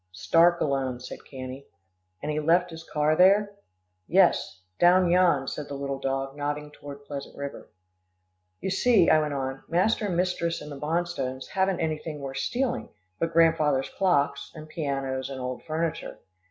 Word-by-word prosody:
"Stark 170 - +3
alone," 135 -3 -1
said 125 - -9
Cannie. 130 0 -8 0.6
"And 150 - -1
he 150 - -1
left 170 +3 +2
his 165 0 -9
car 150 0 +1
there?" 200 +4 +5 0.6
"Yes, 175 - +3 0.2
down 180 0 +5
yon," 175 -7 +3
said 150 - -5
the 140 - -6
little 140 -1 -4
dog, 135 0 -2
nodding 145 0 -3
toward 145 -1 -11
Pleasant 140 -1 -7
River. 140 0 -7 0.9
"You 190 - -2
see," 200 -2 +4
I 155 - +6
went 150 -2 -2
on, 135 0 -3
"master 205 +5 +2
and 175 -3 -1
mistress 175 -2 0
and 150 - -9
the 140 - -7
Bonstones 150 -5 -2
haven't 190 -1 0
anything 155 -1 -3
worth 135 -1 -6
stealing, 245 - -1 0.3
but 165 - 0
grandfathers' 155 -5 +3
clocks, 175 -7 +1
and 155 -1 -9
pianos, 135 -4 -3
and 135 -1 -6
old 125 0 -4
furniture. 160 0 -3
150 Hz, 160 wpm, -26 LUFS, 135-175 Hz, 0.9 s, I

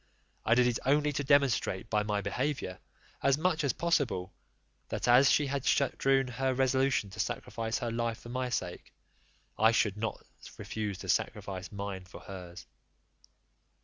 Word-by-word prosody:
I 115 - +4
did 125 0 +5
it 120 -2 +1
only 145 +2 +2
to 145 - -1
demonstrate 130 -7 +2
by 105 -1 +1
my 105 -1 -1
behaviour, 110 -1 -2 0.4
as 140 0 +3
much 160 -1 +1
as 140 - +2
possible, 120 - 0 0.6
that - - -2
as 125 +3 +7
she 150 - +4
had 140 -1 -2
strewn 135 -1 +2
her 130 +1 -1
resolution 130 -5 +2
to 105 - -10
sacrifice 115 0 -2
her 120 -1 -3
life 115 -1 -1
for 120 - -11
my 125 +1 -2
sake, 90 -7 -4 0.7
I 110 +1 +6
would 105 -1 -4
not 110 0 -4 0.3
refuse 105 -3 -4
to - - -9
sacrifice 95 -1 -2
mine 100 -2 -5
for 90 - -12
hers. 90 -2 -9
120 Hz, 155 wpm, -31 LUFS, 100-135 Hz, 0.7 s, as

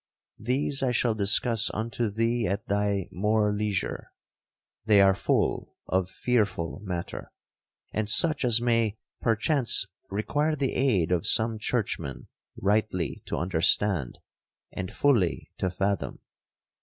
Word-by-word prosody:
These 135 +5 -1
I 130 -2 +1
shall 120 -1 +1
discuss 110 +2 +2
unto 115 +1 -2
thee 115 +2 0
at 100 +3 -3
thy 100 -2 0
more 105 +2 +1
leisure. 105 -2 -3 0.7
They 105 -2 +4
are 95 0 +6
full 95 - -1
of 95 -1 0
fearful 100 -8 -1
matter, 90 -4 -6 0.6
and 110 -1 -1
such 155 +6 +4
as 120 -2 +4
may 115 -3 +1 0.2
perchance 120 +3 +1 0.2
require 145 +10 0
the 135 -3 -1
aid 105 -11 +1
of 90 -3 +1
some 110 0 +4
churchman 70 - -3 0.3
rightly 100 -5 0
to - - -3
understand, 90 -3 +1 0.5
and 95 -1 -5
fully 115 -12 +1
to 95 - 0
fathom. 95 +2 -2
105 Hz, 120 wpm, -27 LUFS, 95-115 Hz, 0.7 s, are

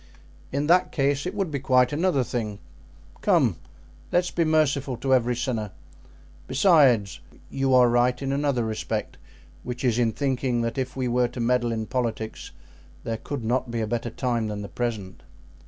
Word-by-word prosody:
"In 140 +2 -1
that 180 +4 +3
case 140 +2 0
it 190 - -5
would 195 -6 -1
be 140 - -2
quite 130 0 +3
another 160 -3 +1
thing. 115 -4 -3 0.6
Come! - - +3 0.5
let's 175 0 +1
be 170 - +1
merciful 145 -5 +1
to 130 +3 0
every 125 -1 +2
sinner! 115 -4 -2 0.8
Besides, 130 - +4 0.3
you 135 -1 +2
are 125 -1 +6
right 120 +1 +2
in 135 -1 -2
another 140 -4 0
respect, 110 -1 -4 0.4
which 125 +1 -6
is 120 -2 +2
in 115 -2 +2
thinking 130 -1 -1
that 115 +2 -2
if 130 - -3
we 130 -1 -1
were 125 0 +2
to 120 - -9
meddle 120 0 +1
in 110 -1 -2
politics 115 -3 -3 0.5
there 115 -1 -3
could 135 +2 -6
not 125 +2 0
be 115 0 -3
a 110 - 0
better 120 +1 -2
time 120 -2 -1
than 105 -1 -4
the 100 - -7
present." 110 -6 -4
125 Hz, 170 wpm, -25 LUFS, 115-140 Hz, 0.8 s, are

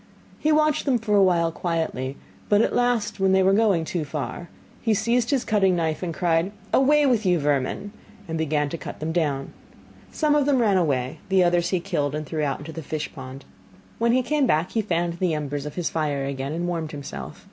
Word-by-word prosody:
He 310 - +2
watched 305 0 +2
them 265 -4 +3
for 215 -2 0
a 200 - +6
while 170 -3 +3
quietly, 160 -6 -2 0.3
but 205 0 +5
at - - 0
last 245 -4 +1
when 190 0 +3
they 190 0 +4
were 190 +1 +4
going 200 -6 +3
too 170 0 -2
far, 150 +4 -5 0.3
he 225 -2 +2
seized 235 +3 +1
his 275 -4 +1
cutting 195 -4 +3
knife, 160 -3 -1
and 180 -2 -2
cried: 170 +2 +1 0.2
'Away 295 +2 +4
with 240 -5 +2
you, 180 -2 +3
vermin,' 145 +6 -1 0.4
and 165 - -3
began 155 -2 0
to 165 - -5
cut - - -8
them 155 +1 -2
down. 145 -5 -1 0.6
Some 305 -2 +1
of 290 -1 +2
them 280 -2 +3
ran 215 -6 +3
away, 135 -7 0
the 190 -1 +4
others 175 0 +2
he 185 - +1
killed, 150 -6 -2
and 155 0 -4
threw 155 +1 -3
out 140 -3 0
into 155 +3 -9
the 165 - -6
fish 155 +1 -5
pond. 135 -1 -9 0.5
When 235 0 +3
he 255 +1 +3
came 295 0 +1
back 160 -2 +1
he 225 - +1
fanned 170 -3 -1
the 180 -4 +1
embers 145 -1 -3
of 150 - -8
his 175 -3 -2
fire 145 -4 -1
again 135 0 -4
and 175 +2 -2
warmed 165 -3 -3
himself. 140 -1 -7
175 Hz, 220 wpm, -24 LUFS, 150-210 Hz, 0.6 s, a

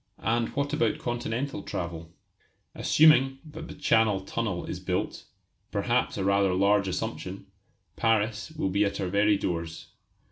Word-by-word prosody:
And 115 +1 0
what 140 0 -1
about 115 - +1
continental 120 +1 -3
travel? 85 -3 -5 0.6
Assuming 135 -4 +5
that 155 - -9
the - - -9
Channel 110 -8 +2
Tunnel 95 -2 -3
is - - -5
built - - -3 0.4
perhaps - - 0
a - - -1
rather 100 -1 +3
large 100 +1 +3
assumption 95 +1 -4 0.5
Paris 110 0 +1
will 155 -12 -2
be 100 +2 +2
at 100 - -1
our 95 - -1
very 100 +2 +3
doors. 85 -3 -4
105 Hz, 140 wpm, -27 LUFS, 95-120 Hz, 0.6 s, Assuming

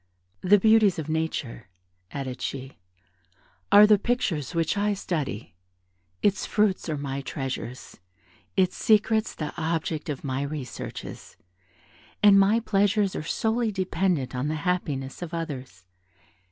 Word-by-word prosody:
"The 205 +3 +6
beauties 215 -1 +4
of 155 -1 -5
nature," 155 - -3 0.4
added 130 -1 -5
she, 135 0 -5 0.9
"are 205 +1 +9
the 210 -1 +5
pictures 180 - -1
which 165 +2 +1
I 205 0 +1
study; 150 - -4 0.7
its 205 -1 +2
fruits 210 -5 +1
are 155 - -1
my 140 -1 -4
treasures; 135 -2 -6 0.6
its 185 -1 +3
secrets 220 0 +2
the 150 -2 -4
object 160 -1 -2
of 145 - -4
my 135 -1 -2
researches, 140 -3 -7 0.9
and 200 -1 +8
my 205 +4 +4
pleasures 205 -2 +1
are - - -2
solely 220 +7 0
dependent 185 -7 -1
on 125 +3 -2
the 155 - -1
happiness 145 -7 -2
of 170 -1 -5
others. 130 - -6
165 Hz, 125 wpm, -26 LUFS, 140-205 Hz, 0.9 s, are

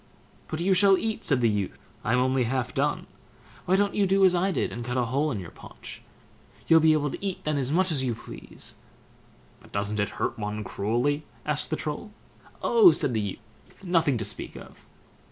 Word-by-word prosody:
"But 155 - -4
you 190 +3 +3
shall 195 +1 +5
eat", 220 +1 -3
said 135 -4 +2
the 120 - +4
youth; 100 -3 -2 0.3
"I'm 125 - +2
only 130 0 +2
half 130 +1 -2
done; - - 0 0.6
why 185 - +4
don't 200 +1 +2
you 200 -2 +2
do 195 +1 +4
as 185 - +5
I 185 +2 +1
did, - - -1
and 120 - -5
cut 125 +1 -3
a 125 - +2
hole 140 +6 0
in 115 -8 -3
your 90 -3 -8
paunch? - - -11 0.6
You'll 165 -1 +6
be 160 0 +5
able 145 -2 0
to - - -7
eat 195 -2 -3
then 150 -1 0
as 135 0 -1
much 185 +2 +2
as 140 -4 0
you 120 -3 -1
please." - - -9 0.8
"But - - -19
doesn't 100 +1 -2
it 100 -1 +1
hurt - - -2
one 105 0 -3
cruelly?" 120 +10 -1 0.2
asked 150 -1 -1
the 155 - 0
Troll. 155 +8 -5 0.5
"Oh", 435 -7 +7
said 130 - +1
the 110 - 0
youth, 100 -2 -4 0.5
"nothing 165 -7 +2
to 110 - -3
speak 105 - -2
of." - - -13
145 Hz, 210 wpm, -26 LUFS, 115-180 Hz, 0.8 s, Oh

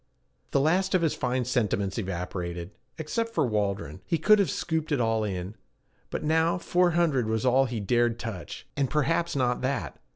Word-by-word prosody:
The - - +2
last 185 +7 +2
of 180 - +2
his 160 - +2
fine 125 0 -1
sentiments 105 -5 0
evaporated. 90 -2 -4 0.3
Except 230 +9 -3
for - - +3
Waldron 100 - -2
he 165 - 0
could 210 +7 +5
have 200 - +2
scooped 160 -2 -2
it 145 - +2
all 115 -2 +1
in; 95 -1 -3 0.6
but - - -4
now 160 +2 +2
four 180 0 +2
hundred 145 -9 +2
was 110 +2 -1
all 130 +2 +4
he 120 -3 -3
dared 120 +3 +1
touch, 110 -7 -7
and 140 -2 0
perhaps 165 +3 +1
not 125 -2 +1
that. 125 - -2
125 Hz, 175 wpm, -27 LUFS, 105-160 Hz, 0.6 s, could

